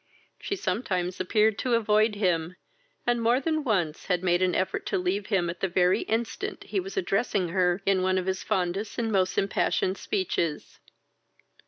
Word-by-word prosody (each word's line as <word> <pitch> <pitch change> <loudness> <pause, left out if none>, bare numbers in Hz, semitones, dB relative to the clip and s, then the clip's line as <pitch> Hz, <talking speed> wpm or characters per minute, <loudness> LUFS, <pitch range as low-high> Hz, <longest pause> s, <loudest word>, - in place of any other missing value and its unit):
She 395 - -3
sometimes 185 - -2
appeared 210 +3 +2
to 250 -2 +1
avoid 215 -1 +3
him, 180 -4 0 0.5
and 240 -1 +1
more 235 +3 +3
than 310 +1 -1
once 180 - -1
had 180 -2 0
made 175 -1 +2
an 185 -1 +2
effort 185 0 -1
to - - 0
leave 190 +2 -1
him 190 -5 +1
at 170 +1 -5
the 195 - 0
very 180 0 +2
instant 225 +1 -3
he - - -2
was 390 +2 -6
addressing 200 - 0
her 180 +1 +1
in 195 -1 +3
one 185 0 +1
of 185 - -1
his 190 0 -1
fondest 185 +3 -2
and 225 -2 -1
most 185 -2 +1
impassioned 195 -1 0
speeches. 170 -6 -2
190 Hz, 175 wpm, -27 LUFS, 180-220 Hz, 0.5 s, avoid